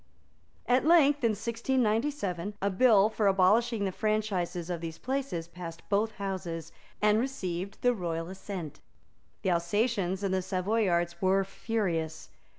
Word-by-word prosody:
At 250 +1 +3
length, 295 -4 +5
in 230 -2 +3
1697, 225 -3 -1
a 200 +1 0
bill 210 0 +5
for 215 -1 0
abolishing 205 +4 +3
the 190 - -1
franchises 195 -5 -1
of 170 -2 -3
these 165 -1 -5
places 260 -11 -3
passed 170 -1 -9
both 210 +2 +1
Houses, 180 -5 -5 0.3
and 210 +1 +5
received 195 -7 -3
the 245 0 +4
royal 165 -5 -3
assent. 185 -4 -7 0.6
The 190 - +2
Alsatians 190 +2 0
and 195 -1 0
Savoyards 185 -3 0
were 190 +1 +3
furious. 185 -6 -3
195 Hz, 130 wpm, -29 LUFS, 175-225 Hz, 0.6 s, length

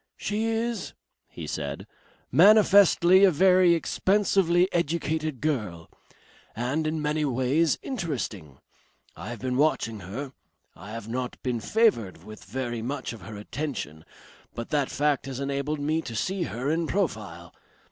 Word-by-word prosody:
"She 215 +2 -2
is," 225 +1 -2 0.3
he - - -8
said, - - -4 0.5
"manifestly 200 -3 +6
a 195 - +8
very 180 +1 +5
expensively 185 0 +2
educated 155 -4 -1
girl. 105 - -3 0.6
And 130 +8 -1
in 155 0 -2
many 150 +1 0
ways 140 +4 +1
interesting. 125 - -4 0.6
I 105 - -8
have 120 - -5
been 125 +2 -2
watching 130 -7 +1
her. 120 +10 -7 0.4
I 95 +5 -11
have 110 -1 -7
not 125 +2 -4
been 125 -2 -1
favoured 160 - +1
with 110 -1 -11
very 120 +2 -4
much 130 +2 -4
of 115 - -11
her 105 +2 -9
attention, 105 - -5 0.5
but 115 0 -6
that 145 -3 +1
fact 145 -2 0
has 135 -1 -5
enabled 140 +2 -2
me 155 +3 0
to 115 - -7
see 185 - -1
her 130 +4 -3
in 165 0 0
profile. 105 - -3
145 Hz, 140 wpm, -26 LUFS, 115-170 Hz, 0.6 s, a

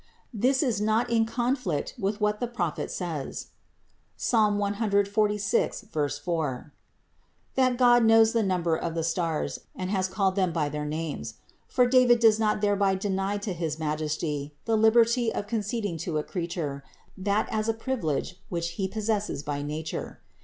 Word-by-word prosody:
42. 225 - -8
This 270 +2 +3
is 235 -7 0
not 220 +3 +1
in 225 -1 +3
conflict 240 - -1
with 200 +2 -1
what 210 0 +1
the 245 - -1
Prophet 180 -10 -3
says, 165 -7 -4 0.7
(Psalm 215 -3 +2
146, 205 +1 +1
4), 145 -1 -2 0.8
that 255 -2 +2
God 240 -1 +5
knows 225 0 +6
the 230 - +3
number 180 -5 +1
of 165 0 -3
the 165 - -1
stars 165 -1 -1 0.2
and 185 0 -4
has 190 -2 +1
called 190 0 0
them 185 -3 +1
by 155 -3 0
their 150 +1 -4
names; 155 0 -4 0.3
for 250 - +3
David 245 -1 +5
does 220 -2 +5
not 210 -1 +1
thereby 200 -2 +2
deny 195 +1 -1
to 205 -1 -3
his 165 -3 -3
Majesty 150 -1 -2
the 225 - +2
liberty 230 +2 +4
of 205 - -3
conceding 210 -3 -2
to 160 0 -2
a 150 - 0
creature 165 -6 -4 0.3
that 200 +2 0
as 220 0 0
a - - +3
privilege 200 - -2
which 170 -1 -2
He 190 +3 -2
possesses 210 -6 -2
by 145 -1 -3
nature. 150 +2 -5
200 Hz, 160 wpm, -27 LUFS, 165-225 Hz, 0.8 s, knows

